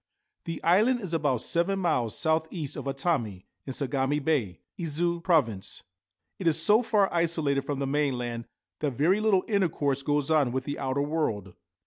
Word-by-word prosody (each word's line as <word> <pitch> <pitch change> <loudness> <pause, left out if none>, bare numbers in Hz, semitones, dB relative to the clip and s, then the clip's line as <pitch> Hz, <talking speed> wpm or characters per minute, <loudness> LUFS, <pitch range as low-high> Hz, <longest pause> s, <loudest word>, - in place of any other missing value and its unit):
The 165 -2 -5
island 215 +9 +3
is 185 -5 -5
about 145 -7 +1
seven 175 +4 +1
miles 140 - 0
south 160 0 +1
east 155 -6 -5
of - - -6
Atami, 135 - -2 0.2
in - - -3
Sagami 135 +1 0
Bay 135 - -1 0.2
(Izu 170 +1 0
Province). 125 - 0 0.6
It 185 - -2
is 160 -1 +4
so 210 +7 +5
far 210 -4 +2
isolated 160 -5 +1
from 145 -1 -3
the 140 - -2
mainland 125 -5 -2 0.3
that 145 -3 -1
very 165 - +2
little 215 -4 +2
intercourse 155 - 0
goes 145 +1 0
on 145 -6 +3
with 130 +1 -2
the 145 +1 -5
outer 135 +1 -1
world. 115 - -2
150 Hz, 165 wpm, -27 LUFS, 135-170 Hz, 0.6 s, so